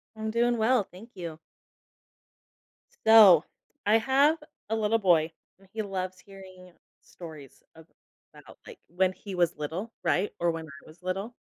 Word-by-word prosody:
I'm 220 0 -4
doing 240 +1 +1
well. 225 +1 +3
Thank 220 +7 -14
you. 170 -3 -7 1.7
So, 210 -7 +8 0.4
I 215 +2 +5
have 275 +6 +3 0.3
a 225 - 0
little 220 0 +1
boy, 170 -5 +3 0.3
and 195 - -22
he 220 - -2
loves 185 -2 -5
hearing 185 -2 -14 0.3
stories 155 -6 -12
about, 160 0 -19
like, 485 - -12
when 185 +1 0
he 195 0 -9
was 175 -2 +1
little, 165 +9 -5
right, 195 +3 +1
or 170 0 +2
when 165 -1 -6
I 155 0 -14
was 160 +3 -17
little. 195 +6 -4
190 Hz, 145 wpm, -27 LUFS, 175-220 Hz, 1.7 s, So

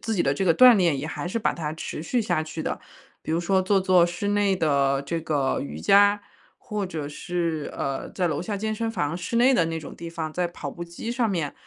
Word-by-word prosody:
自 225 - -2
己 175 - +2
的 135 - +2
这 170 +7 -1
个 170 -3 +4
锻 250 +5 +8
炼 175 -6 +2
也 145 - -4
还 160 - -5
是 185 - -3
把 220 - +1
它 155 -2 -4
持 160 - -6
续 235 +8 0
下 175 -6 0
去 155 0 -6
的。 - - -3 0.4
比 - - -6
如 165 - +1
说 190 +2 +2
做 195 +1 +2
做 185 -2 +4
室 175 +4 -3
内 205 -1 +2
的 140 -5 +1
这 165 +4 -3
个 150 -4 0
瑜 75 +2 -6
伽， 205 - +5 0.4
或 210 -2 -4
者 155 -5 -5
是， 165 -1 -3
呃， 135 -1 -3
在 180 -2 -1
楼 150 -3 -2
下 200 +4 -3
健 215 +2 -2
身 230 +1 -2
房 170 -7 -2
室 180 +6 -5
内 250 +3 +5
的 180 -10 +3
那 165 0 -3
种 150 - -9
地 170 - -7
方， 165 -2 -5
在 180 +2 0
跑 150 -4 -7
步 175 - -8
机 170 +7 -7
上 240 -2 +1
面， 165 -8 -2
175 Hz, 265 characters per minute, -25 LUFS, 155-200 Hz, 0.4 s, 锻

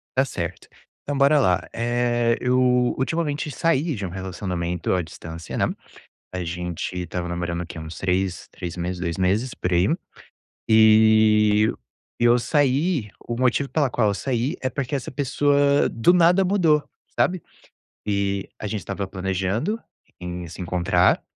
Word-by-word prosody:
Tá 130 +1 +3
certo. 90 -8 -5 0.4
Então 145 0 -3
bora 140 +2 +5
lá, 90 -9 +2
eh, 120 0 +1
eu 125 0 +2 0.4
ultimamente 150 +1 -1
saí 160 -1 0
de 100 -3 -4
um - - -4
relacionamento 90 -2 -3
à 90 - +1
distância, 80 0 -8
né. - - +2 0.7
A 90 -1 -3
gente 90 +1 -4
estava 90 +1 -4
namorando, 85 0 -3
o - - -5
quê? 85 - -9
Uns 80 +1 -8
3, 95 0 -1
3 90 -1 -7
meses, 90 +1 -3
2 85 -1 -3
meses, 100 +7 0
por 90 - -2
aí, 90 +2 +3 0.8
e 110 -1 +5
u - - -11 0.4
e - - +4
eu 120 +1 +6
saí, 140 - +1 0.2
o 120 - -1
motivo 130 +2 +1
pela 145 -4 +1
qual 110 -3 +1
eu - - 0
saí 130 - -1
é 130 - 0
porque 135 0 -4
essa 135 - -4
pessoa 140 +1 +2
do 115 +9 +3
nada 180 +2 +5
mudou, 170 -6 +3 0.3
sabe. 185 -1 +1 0.7
E, 100 -1 -1
a 105 - -4
gente 105 0 -3
estava 100 0 -4
planejando 95 - -2 0.4
em 90 0 -6
se 85 - -9
encontrar, 90 0 +2
110 Hz, 155 wpm, -23 LUFS, 90-135 Hz, 0.8 s, eu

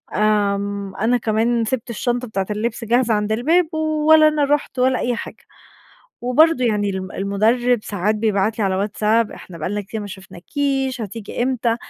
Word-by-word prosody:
امم، 200 -1 0
أنا 235 +4 +2
كمان 225 +1 0
سبت 240 0 -3
الشنطة 245 +2 -2
بتاعة 195 -3 -3
اللبس 225 +3 -3
جاهزة 240 0 +2
عند 210 0 0
الباب، 320 +9 +2
ولا 310 0 +4
أنا 305 -1 +1
رحت 285 -2 -1
ولا 255 0 +2
أي 245 -1 -1
حاجة. - - -8 0.8
وبرضه 255 +2 +3
يعني 205 -3 +1
ال 190 -1 -5
المدرب 225 +5 +1
ساعات 205 +1 -1
بيبعت 215 0 0
لي 210 - +1
على 190 -1 0
واتساب 215 +2 +1
"إحنا 170 -3 -11
بقى 155 - -3
لنا 205 +1 -2
كتير 210 +2 -6
ما 205 - -6
شُفناكيش، 260 - -3
هتيجي 220 +2 -5
إمتى؟" 240 -3 0
225 Hz, 165 wpm, -20 LUFS, 205-250 Hz, 0.8 s, ولا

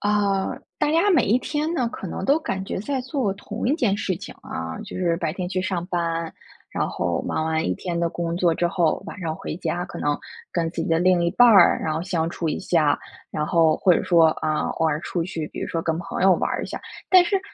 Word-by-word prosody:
呃， 205 -2 +1 0.2
大 295 - +2
家 340 +6 +4
每 350 - +4
一 225 +5 +3
天 300 +4 -2
呢， 255 -8 0
可 195 - -7
能 190 - -5
都 280 +8 +4
感 195 -12 -3
觉 - - -4
在 265 +7 -2
做 255 -5 -1
同 205 +3 -5
一 280 - +3
件 235 -11 +1
事 195 -2 -1
情， - - -9
啊， 80 0 -5
就 - - -8
是 170 -2 +1
白 165 -3 -2
天 180 0 -4
去 185 0 -1
上 185 -2 -2
班， 165 -2 -2 0.4
然 - - -1
后 - - -1
忙 155 - -1
完 160 0 0
1 90 - +1
天 170 - -4
的 170 -1 0
工 170 -1 -3
作 175 -2 +2
之 175 - +1
后 170 -3 +1
晚 - - -8
上 165 -3 -2
回 160 - -6
家， 175 0 -2
可 - - -8
能 145 0 0 0.3
跟 165 -2 0
自 165 - -3
己 - - -3
的 165 -1 +3
另 180 0 +3
一 170 - +2
半 245 +6 +6
儿， 195 -6 +6
然 155 -1 -1
后 160 - -2
相 170 -3 -1
处 170 -1 -3
一 - - -1
下。 160 -6 +2 0.3
然 150 0 -2
后 165 -2 +3
或 180 -3 +5
者 - - 0
说， 170 -2 +5
啊， 155 -1 0
偶 160 - 0
尔 150 -1 0
出 175 -1 -2
去， 165 -3 -4
比 - - -8
如 - - -2
说 165 - -1
跟 160 0 -1
朋 175 - -5
友 190 0 +6
玩 - - -1
儿 - - -2
一 - - -4
下。 - - -5 0.3
但 370 -1 +7
是 390 +2 +1
175 Hz, 270 characters per minute, -23 LUFS, 165-205 Hz, 0.4 s, 但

